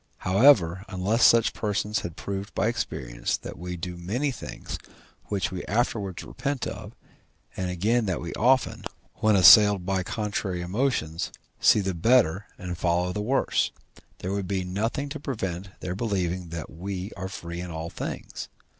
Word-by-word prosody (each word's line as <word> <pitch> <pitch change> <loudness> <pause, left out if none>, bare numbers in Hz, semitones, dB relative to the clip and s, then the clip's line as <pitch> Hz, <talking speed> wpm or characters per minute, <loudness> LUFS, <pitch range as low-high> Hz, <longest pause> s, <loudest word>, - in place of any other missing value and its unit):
However, 95 - +5
unless 100 +5 +1
such 115 -1 +6
persons 105 -1 -1
had 85 -3 -6
proved 100 0 -5
by 95 - +1
experience 65 - -2
that - - -8
we 90 0 -5
do 90 +1 -5
many 120 +12 -1
things 125 - -7 0.5
which 100 -2 -1
we 90 -1 -4
afterwards 105 -4 -1
repent 140 -2 -3
of, - - -6 0.6
and 95 -1 -2
again 105 +6 +1
that 90 -4 0
we 85 - -5
often, 130 +3 +2 0.3
when 110 -1 +3
assailed 100 0 +8
by 95 0 +1
contrary 100 -2 -2
emotions, 90 - -1 0.3
see 105 - +5
the 95 -1 -1
better 100 0 +3
and 90 -2 -6
follow 90 +1 +1
the 105 - -2
worse, 130 +6 +1 0.5
there 95 - -4
would 100 -1 -2
be 95 -1 -1
nothing 110 +10 -2
to - - -5
prevent 95 -9 -4
their 90 - -3
believing 95 -4 -2
that 85 -1 -6
we 95 +3 -5
are 95 -1 -5
free 85 -3 -6
in 90 - -6
all 80 0 -5
things. - - -6
95 Hz, 160 wpm, -26 LUFS, 90-110 Hz, 0.6 s, assailed